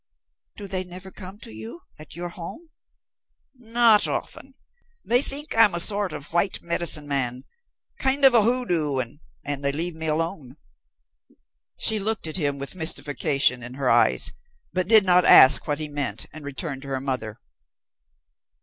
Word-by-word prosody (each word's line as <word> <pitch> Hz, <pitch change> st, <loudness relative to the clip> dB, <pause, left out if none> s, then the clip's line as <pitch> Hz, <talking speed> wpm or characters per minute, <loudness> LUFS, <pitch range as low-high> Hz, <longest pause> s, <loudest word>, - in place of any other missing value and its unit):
"Do 205 Hz, -, -8 dB
they 185 Hz, -1 st, -3 dB
never 185 Hz, +1 st, -11 dB
come 190 Hz, +1 st, -11 dB
to -, -, -11 dB
you, 110 Hz, +9 st, -9 dB, 0.2 s
at 155 Hz, -1 st, -12 dB
your 175 Hz, +1 st, -6 dB
home?" 315 Hz, -, -10 dB, 0.8 s
"Not 235 Hz, -3 st, +3 dB
often. 270 Hz, 0 st, -5 dB, 0.5 s
They 245 Hz, +2 st, +3 dB
think 285 Hz, +2 st, 0 dB
I'm 220 Hz, -5 st, +4 dB
a -, -, -1 dB
sort 200 Hz, +1 st, +2 dB
of 145 Hz, -, -10 dB
white 175 Hz, +3 st, 0 dB
'medicine 170 Hz, -3 st, +1 dB
man' 130 Hz, -3 st, 0 dB, 0.6 s
kind 270 Hz, +1 st, +1 dB
of 265 Hz, -, +6 dB
a 230 Hz, -, +5 dB
hoodoo, 180 Hz, -, +1 dB
and 130 Hz, +2 st, -2 dB, 0.4 s
leave 155 Hz, +5 st, -1 dB
me 160 Hz, 0 st, -6 dB
alone." 155 Hz, -3 st, -3 dB, 1.2 s
She 220 Hz, -1 st, 0 dB
looked 215 Hz, 0 st, -3 dB
at 155 Hz, +2 st, -1 dB
him 145 Hz, -4 st, -1 dB
with 140 Hz, 0 st, -5 dB
mystification 145 Hz, -6 st, 0 dB
in 125 Hz, +1 st, -8 dB
her 135 Hz, -2 st, 0 dB
eyes, -, -, +3 dB, 0.4 s
but 185 Hz, -1 st, -1 dB
did 215 Hz, -2 st, +6 dB
not 180 Hz, -1 st, +4 dB
ask 135 Hz, 0 st, +7 dB
what 145 Hz, -1 st, -1 dB
he 155 Hz, 0 st, -3 dB
meant, 145 Hz, -3 st, -3 dB
and 155 Hz, -, -9 dB
returned 145 Hz, -1 st, -6 dB
to 140 Hz, -, -11 dB
her 135 Hz, -1 st, -3 dB
mother. 130 Hz, -5 st, -4 dB
165 Hz, 160 wpm, -23 LUFS, 140-205 Hz, 1.2 s, ask